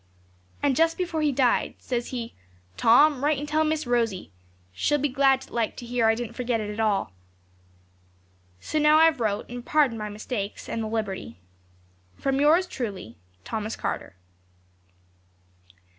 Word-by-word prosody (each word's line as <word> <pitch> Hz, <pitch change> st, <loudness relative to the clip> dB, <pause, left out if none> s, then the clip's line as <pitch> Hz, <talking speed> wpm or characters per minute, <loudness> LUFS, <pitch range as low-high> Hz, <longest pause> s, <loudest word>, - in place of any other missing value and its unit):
'And 280 Hz, -2 st, +3 dB
just 330 Hz, +3 st, +2 dB
before 345 Hz, -4 st, -2 dB
he 300 Hz, -1 st, +2 dB
died, 255 Hz, -2 st, +1 dB
says 240 Hz, -2 st, -3 dB
he, 235 Hz, -3 st, -5 dB, 0.4 s
"Tom, 275 Hz, -, +5 dB
write 295 Hz, 0 st, +2 dB
and 290 Hz, +2 st, -5 dB
tell 310 Hz, +1 st, +2 dB
Miss 310 Hz, -1 st, -1 dB
Rosie; 230 Hz, -, -1 dB, 0.4 s
she'll 295 Hz, -, +1 dB
be 290 Hz, +1 st, 0 dB
glad 270 Hz, 0 st, +2 dB
like 230 Hz, -2 st, -1 dB
to 245 Hz, -, -8 dB
hear 235 Hz, -1 st, +1 dB
I 225 Hz, -, +4 dB
didn't 235 Hz, 0 st, -5 dB
forget 245 Hz, -1 st, -1 dB
it 210 Hz, 0 st, -5 dB
all." 210 Hz, -, +1 dB, 1.5 s
'So 310 Hz, -, -2 dB
now 300 Hz, +1 st, +5 dB
I've 320 Hz, -3 st, +5 dB
wrote, 215 Hz, -2 st, -1 dB
and 245 Hz, 0 st, -7 dB
pardon 270 Hz, -5 st, +2 dB
my 210 Hz, 0 st, -4 dB
mistakes, 210 Hz, 0 st, -5 dB
and 230 Hz, -, -3 dB
the 220 Hz, -, -3 dB
liberty. 205 Hz, -, -4 dB, 0.8 s
'From 270 Hz, 0 st, 0 dB
yours 325 Hz, +5 st, +5 dB
truly, 200 Hz, -, -6 dB, 0.3 s
'THOMAS 220 Hz, 0 st, -3 dB
CARTER.' -, -, -4 dB
245 Hz, 150 wpm, -25 LUFS, 220-295 Hz, 1.5 s, Tom